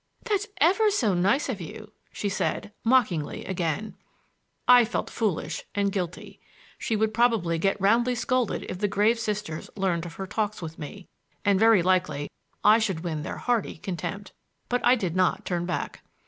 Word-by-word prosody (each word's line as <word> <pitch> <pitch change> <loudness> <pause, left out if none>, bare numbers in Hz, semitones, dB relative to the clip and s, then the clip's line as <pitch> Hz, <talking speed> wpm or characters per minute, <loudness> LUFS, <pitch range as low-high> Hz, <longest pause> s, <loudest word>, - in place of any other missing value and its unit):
"That's 420 -3 0
ever 390 +8 +4
so 240 - +1
nice 195 +11 +2
of 220 -8 -3
you," 215 +6 -9 0.2
she 205 - -3
said, 200 +1 -2
mockingly 225 - +1
again. 185 +3 -2 0.7
I 245 -1 +8
felt 235 - -3
foolish 210 -8 -2
and 200 -1 +1
guilty. 180 -3 -5 0.4
She 225 - -1
would 220 0 +1
probably 220 -8 +2
get 195 +3 +1
roundly 235 +6 +3
scolded 255 -1 0
if 180 - -5
the 205 - +1
grave 210 +4 +2
Sisters 210 -7 -3
learned 180 -4 0
of 165 - -10
her 195 - -5
talks 210 +1 -2
with 165 -2 -7
me, 175 +5 -8 0.4
and 200 -2 +4
very 220 -4 +5
likely 155 -6 +1 0.3
I 215 +2 +7
should 195 -7 -1
win 160 -3 -3
their - - -5
hearty 240 -4 0
contempt. 190 +3 -5 0.4
But 245 0 0
I 250 - +6
did 185 -8 -2
not 185 +2 +1
turn 175 -1 -2
back. 180 - -3
205 Hz, 170 wpm, -26 LUFS, 180-230 Hz, 0.7 s, I